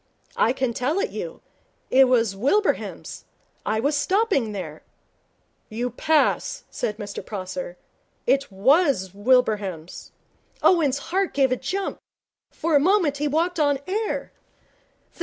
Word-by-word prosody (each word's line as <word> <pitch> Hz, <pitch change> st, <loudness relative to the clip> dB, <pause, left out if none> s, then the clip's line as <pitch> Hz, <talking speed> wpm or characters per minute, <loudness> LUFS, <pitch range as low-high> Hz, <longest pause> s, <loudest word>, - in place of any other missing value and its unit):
'I 235 Hz, -, +3 dB
can 260 Hz, -2 st, -1 dB
tell 275 Hz, +10 st, 0 dB
it 450 Hz, -, -1 dB
you. -, -, -6 dB, 0.5 s
It 265 Hz, 0 st, +6 dB
was 230 Hz, -5 st, +2 dB
Wilbraham's. 285 Hz, -, -1 dB, 0.4 s
I 220 Hz, +1 st, +1 dB
was 285 Hz, +6 st, +1 dB
stopping 375 Hz, -, +1 dB
there.' 165 Hz, -7 st, -6 dB, 0.9 s
'You 240 Hz, +3 st, -3 dB
pass,' 315 Hz, -, +1 dB
said 210 Hz, -, -3 dB
Mr 205 Hz, -2 st, -6 dB
Prosser. 185 Hz, -3 st, -6 dB, 0.5 s
'It 275 Hz, -3 st, +1 dB
was 245 Hz, -, +2 dB
Wilbraham's.' 205 Hz, -7 st, 0 dB, 0.5 s
Owen's 300 Hz, -7 st, +4 dB, 0.2 s
heart 385 Hz, 0 st, 0 dB
gave 270 Hz, -2 st, +3 dB
a -, -, +3 dB
jump. 375 Hz, +10 st, -3 dB, 0.5 s
For 320 Hz, -1 st, -1 dB
a -, -, +7 dB
moment 335 Hz, -3 st, +2 dB
he 295 Hz, +1 st, -1 dB
walked 330 Hz, +4 st, 0 dB
on 285 Hz, -2 st, +3 dB
air. 425 Hz, +3 st, -2 dB
270 Hz, 125 wpm, -24 LUFS, 215-330 Hz, 0.9 s, a